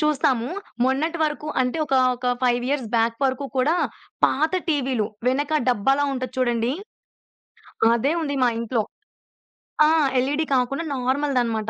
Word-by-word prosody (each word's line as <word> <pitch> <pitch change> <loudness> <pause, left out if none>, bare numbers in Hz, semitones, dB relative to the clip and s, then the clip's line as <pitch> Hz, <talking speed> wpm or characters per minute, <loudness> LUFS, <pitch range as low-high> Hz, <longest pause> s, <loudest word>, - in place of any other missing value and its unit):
చూస్తాము. 265 -5 +1 0.4
మొన్నటి 310 +6 0
వరకు 300 -1 -2
అంటే 255 +5 0
ఒకా, 270 -2 +1 0.2
ఒక 250 - -5 0.2
5 245 -1 +2
ఇయర్స్ 275 -5 -1
బ్యాక్ 230 0 +2
వరకు 260 +1 0
కూడా 285 +6 +3 0.5
పాత 310 +4 +2 0.2
టీవీలు 260 -8 0 0.2
వెనక 290 +4 +1
డబ్బాలా 270 +5 +2
ఉంటది 255 -1 -4
చూడండి, 240 -1 +1 1.2
అదే 270 +6 +1
ఉంది 285 -3 -2
మా 245 - +4
ఇంట్లో. 230 0 0 1.1
ఆ! - - +4 0.3
ఎల్ఈడీ 290 +5 0
కాకుండా 260 +5 0
నార్మల్‌దనమాట. 250 -4 0
260 Hz, 130 wpm, -23 LUFS, 245-290 Hz, 1.2 s, మా